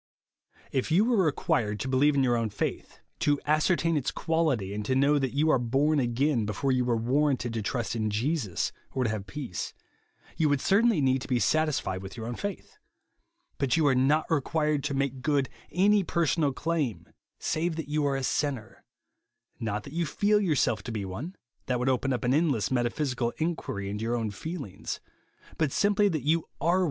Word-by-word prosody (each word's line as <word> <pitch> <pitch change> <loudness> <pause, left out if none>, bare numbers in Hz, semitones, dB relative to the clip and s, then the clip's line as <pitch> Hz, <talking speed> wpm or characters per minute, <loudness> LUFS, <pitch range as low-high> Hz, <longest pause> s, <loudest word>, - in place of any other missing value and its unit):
If 130 +2 -1
you 180 +7 +4
were 230 -5 +3
required 110 -8 0
to - - -3
believe 140 +3 +3
in 135 - +3
your 125 -2 +3
o^vn 115 -2 -1
faith, - - -4 0.2
to 145 -1 +2
ascertain 165 +2 +2
its 145 -4 0
quality, 155 - 0
and 105 +1 -3
to 130 - +1
know 140 +2 +4
that 135 -1 -2
you 155 +2 +3
are 130 - +3
born 140 +6 +2
again, 125 0 +1
before 130 +7 -1
you 130 -1 +2
were 120 -2 +1
warranted 130 0 +1
to 115 - -2
trust 120 +2 -2
in 110 -1 0
Jesus, 110 - -1 0.2
or 130 - 0
to 115 - 0
have 105 -2 -4
peace, 120 -4 -5 0.6
you 155 -2 +2
would 145 -1 +2
certainly 205 - +3
need 130 -1 +2
to - - -7
be 125 - +1
satis 155 +4 +2
fied 95 0 -4
with 95 +3 -9
your 110 - -5
own 120 - -3
faith. 205 - -6 0.8
But 140 +2 +2
you 160 - +3
are 140 - +5
not 140 +5 +3
required 150 -1 +1
to 140 -2 -1
make 135 -1 -1
good 140 -2 +1 0.2
any 200 +4 +4
personal 165 -4 +1
claim, 135 - -2 0.3
save 165 +1 -1
that 160 -2 -5
you 150 0 0
are 140 - 0
a 135 - -2
sinner; 130 -5 -2 0.4
— - - -49
not 105 0 -2
that - - -10
you 170 0 0
feel 210 +6 +2
yourself 160 -9 +1
to 120 - -4
be 105 -3 -3
one 120 - -6 0.3
(that 125 - +1
would 125 +2 0
open 130 +1 +1
up 125 0 -1
an 125 +1 +2
endless 140 - +1
metaphysical 125 -1 0
inquiry 155 - -2
into 105 +2 -4
your 115 +2 0
own 110 -3 -2
feelings); 135 - -6 0.3
— - - -25
but 155 -4 +2
simply 205 +3 +3
that 155 -7 -2
you 160 +4 +3
aro - - -14
JESUS - - -33
ONLY. 175 +3 +3
140 Hz, 205 wpm, -28 LUFS, 120-155 Hz, 0.8 s, are